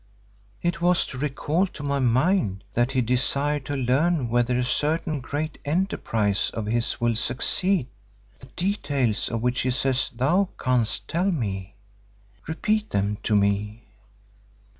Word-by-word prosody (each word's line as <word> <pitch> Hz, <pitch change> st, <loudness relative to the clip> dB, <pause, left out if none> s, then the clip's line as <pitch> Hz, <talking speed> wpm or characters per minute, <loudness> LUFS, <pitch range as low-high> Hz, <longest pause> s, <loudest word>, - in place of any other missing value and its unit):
"It 175 Hz, 0 st, -1 dB
was 175 Hz, 0 st, +3 dB
to 125 Hz, -, -7 dB
recall 150 Hz, +6 st, 0 dB
to 150 Hz, -, -10 dB
my 140 Hz, -1 st, 0 dB
mind 125 Hz, -, +2 dB
that 120 Hz, +3 st, +1 dB
he 130 Hz, -, +2 dB
desired 135 Hz, +4 st, 0 dB
to 145 Hz, -, -2 dB
learn 135 Hz, +2 st, +1 dB
whether 120 Hz, +1 st, +2 dB
a 125 Hz, -, +1 dB
certain 150 Hz, +4 st, 0 dB
great 150 Hz, +4 st, -4 dB
enterprise 115 Hz, -, 0 dB
of 110 Hz, -, -3 dB
his 115 Hz, +4 st, -1 dB
will 120 Hz, -1 st, +2 dB
succeed, 135 Hz, -, +1 dB, 0.5 s
the 130 Hz, -, -14 dB
details 140 Hz, -, 0 dB
of 115 Hz, -1 st, -3 dB
which 125 Hz, +1 st, +1 dB
he 130 Hz, -, 0 dB
says 130 Hz, 0 st, +1 dB
thou 170 Hz, +11 st, +1 dB
canst 125 Hz, -4 st, +1 dB
tell 180 Hz, +4 st, +1 dB
me. 100 Hz, -, -3 dB, 0.7 s
Repeat 210 Hz, +7 st, 0 dB
them 100 Hz, +1 st, -1 dB
to 105 Hz, -, +1 dB
me." 105 Hz, +2 st, 0 dB
130 Hz, 140 wpm, -25 LUFS, 115-155 Hz, 0.7 s, was